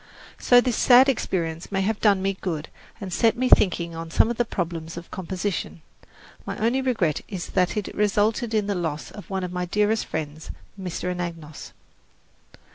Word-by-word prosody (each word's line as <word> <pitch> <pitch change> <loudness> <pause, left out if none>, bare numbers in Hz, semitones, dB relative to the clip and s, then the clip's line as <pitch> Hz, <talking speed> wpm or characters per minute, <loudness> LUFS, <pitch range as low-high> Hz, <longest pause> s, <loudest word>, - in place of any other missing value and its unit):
So 245 0 +6
this 245 -3 -1
sad 255 +1 +7
experience 170 -10 -2
may 195 -1 0
have 215 +2 0
done 200 -3 +3
me 195 0 +1
good 160 -5 -3 0.3
and 190 -3 -6
set 230 +4 +3
me 255 +1 +1
thinking 170 -3 +4
on 165 0 -6
some 220 - +3
of 240 - -4
the 240 - +2
problems 165 -5 -4
of 170 - -9
composition. 180 - -4 0.6
My - - -5
only 235 +5 +1
regret 220 - 0
is 185 -4 -6
that 185 +2 +1
it 210 - -3
resulted 210 +3 +1
in 210 -2 +2
the 205 - -1
loss 155 -8 -3
of 205 - -11
one 190 -1 -2
of 180 0 -4
my 180 0 -2
dearest 210 +4 +1
friends, 155 0 -5 0.3
Mr. 180 0 -3
Anagnos. 165 -4 -7
190 Hz, 180 wpm, -24 LUFS, 170-215 Hz, 0.6 s, sad